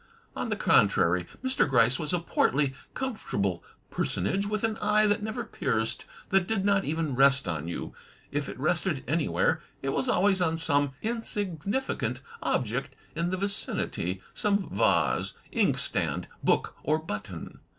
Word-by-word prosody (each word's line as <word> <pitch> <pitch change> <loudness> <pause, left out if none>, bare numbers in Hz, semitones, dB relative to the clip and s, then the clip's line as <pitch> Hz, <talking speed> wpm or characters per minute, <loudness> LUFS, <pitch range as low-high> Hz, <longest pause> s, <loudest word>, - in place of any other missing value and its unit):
On - - -2
the - - +1
contrary, 85 +1 +3 0.2
Mr. 260 - +2
Gryce 125 0 +4
was 150 -2 -2
a 180 - +2
portly, 145 -4 +1 0.2
comfortable 100 - -2 0.3
personage 195 - 0
with 215 0 -2
an 225 -1 0
eye 210 +1 +4
that 205 +1 +2
never 220 +3 -3
pierced, 115 - -1 0.2
that 195 -3 +3
did 220 -3 0
not 200 -1 +3
even 160 -2 -1
rest 135 -1 +4
on 80 -2 -2
you. 85 - -5 0.4
If - - -2
it - - -8
rested - - +1
anywhere, - - +1 0.2
it 135 - 0
was 255 - 0
always 195 -3 +3
on 165 -2 +2
some 145 -3 +2
insignificant 210 - -2 0.2
object - - -1 0.2
in 170 +1 0
the 185 - -1
vicinity, 95 - -2
some 200 -2 0
vase, - - +2 0.2
inkstand, - - +1 0.2
book, - - +2
or 155 +2 +2
button. 105 - -6
170 Hz, 145 wpm, -28 LUFS, 135-205 Hz, 0.4 s, Gryce